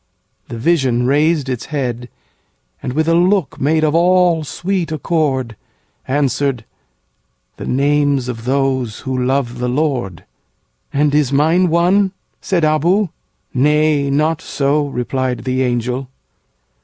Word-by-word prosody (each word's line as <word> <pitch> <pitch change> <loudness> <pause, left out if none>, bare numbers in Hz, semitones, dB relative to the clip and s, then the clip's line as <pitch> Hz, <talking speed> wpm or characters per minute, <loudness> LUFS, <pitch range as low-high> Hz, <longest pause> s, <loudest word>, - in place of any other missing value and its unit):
'—The 115 - -7
vision 130 -3 +1
raised 150 +2 +2
its 125 -3 -4
head, 125 -5 -3 0.7
And, 125 - -4
with 155 +3 0
a 165 - +3
look 180 -3 +1
made 155 +3 +2
of 150 -1 +2
all 175 -1 +3
sweet 175 +2 -3
accord, 140 -7 -1 0.5
Answered, 135 -3 0 0.9
'The - - -7
names 140 -1 +1
of 115 -2 -6
those 130 -4 -1
who 130 -1 -3
love 125 -2 -1
the 125 0 -1
Lord.''And 125 - -3
is 145 -3 +2
mine 160 +6 +3
one?' 185 +4 +2 0.3
said 180 -4 0
Abou. 170 +6 +2 0.4
'Nay, 150 +1 +2
not 150 +3 +1
so,'Replied 135 -3 -1
the 130 0 -1
angel. 125 +1 -1
140 Hz, 120 wpm, -17 LUFS, 125-160 Hz, 0.9 s, a